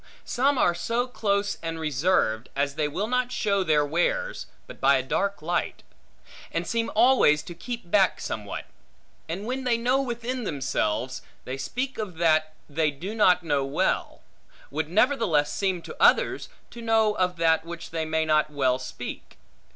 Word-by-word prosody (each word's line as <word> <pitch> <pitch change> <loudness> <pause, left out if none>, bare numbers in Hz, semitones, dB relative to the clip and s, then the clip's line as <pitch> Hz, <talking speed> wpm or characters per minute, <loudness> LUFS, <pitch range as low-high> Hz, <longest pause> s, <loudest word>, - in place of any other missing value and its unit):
Some 275 +3 +1
are 175 - +3
so 230 +8 -1
close 205 -4 -1
and 165 0 -4
reserved, 145 -7 +1
as 140 0 0
they 150 0 0
will 185 +8 -2
not 250 +2 0
show 200 -5 +1
their 150 -4 +3
wares, 480 - -1 0.2
but - - -12
by 140 +1 +5
a 130 - -1
dark 200 +6 -1
light; 175 +2 -2 0.7
and - - -2
seem 230 -1 -1
always 220 - +5
to 175 - -8
keep 230 -1 -7
back 195 -3 +3
somewhat; 105 -2 -5 0.6
and 185 +5 -4
when 260 +3 -3
they 245 -2 +2
know 250 +3 +2
within 245 0 -3
themselves, 130 - -2 0.2
they 130 - -4
speak 255 - -4
of 195 -6 -5
that 155 -2 +2
they 155 +1 +1
do 170 +9 -6
not 185 -5 +4
well 145 -4 +1
know, 135 0 -1 0.5
would 155 +2 -2
nevertheless 195 - +2
seem 190 -4 -1
to - - -9
others, - - +3 0.2
to 235 - -9
know 225 -2 +3
of 180 -1 +1
that 165 -1 +2
which 170 0 -8
they 165 -1 -2
may 160 0 0
not 155 -1 +2
well 130 -3 +1
speak. 130 - -8
175 Hz, 165 wpm, -26 LUFS, 150-230 Hz, 0.7 s, by